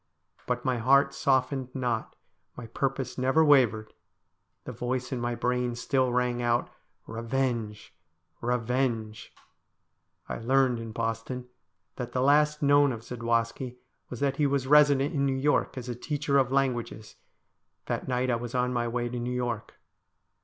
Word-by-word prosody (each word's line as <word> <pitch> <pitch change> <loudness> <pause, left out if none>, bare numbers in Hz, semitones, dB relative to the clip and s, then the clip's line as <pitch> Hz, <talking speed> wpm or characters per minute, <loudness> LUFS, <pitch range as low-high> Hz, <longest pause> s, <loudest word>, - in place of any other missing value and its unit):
But 125 0 -2
my 130 -1 +1
heart 140 +4 +4
softened 130 -2 0
not, 120 -4 -2 0.4
my 120 - -7
purpose 135 +3 -3
never 135 +5 +3
wavered; 115 -7 +3 0.7
the - - -6
voice 125 +1 -3
in 125 -2 -2
my 120 0 -1
brain 125 0 -1
still 130 +1 0
rang 125 0 0
out 120 0 0 0.2
' - - -43
Bevenge! 115 -3 -3 0.5
revenge! 120 -2 -1 0.5
' - - -47
I - - -5
learned 130 0 +2
in 115 -1 -6
Boston 115 +2 -4 0.5
that 120 -2 -5
the 125 - 0
last 150 +2 +3
known 145 0 +5
of 115 -3 -5
Zadwaski 115 +1 -2 0.3
was 125 - -7
that 140 -1 0
he 150 - +3
was 140 -2 0
resident 145 0 +5
in 140 -2 0
New 135 -1 +1
York 145 0 +1
as 125 -1 -6
a 125 - -3
teacher 140 +2 0
of 130 -1 +1
languages: 125 -5 -1 0.7
that - - -3
night 125 0 0
I 120 - +1
was 120 +1 -6
on 125 0 +1
my 120 -1 0
way 120 +1 -2
to 120 0 -4
New 120 +1 -3
York. 120 -3 -3
125 Hz, 160 wpm, -28 LUFS, 120-135 Hz, 0.7 s, known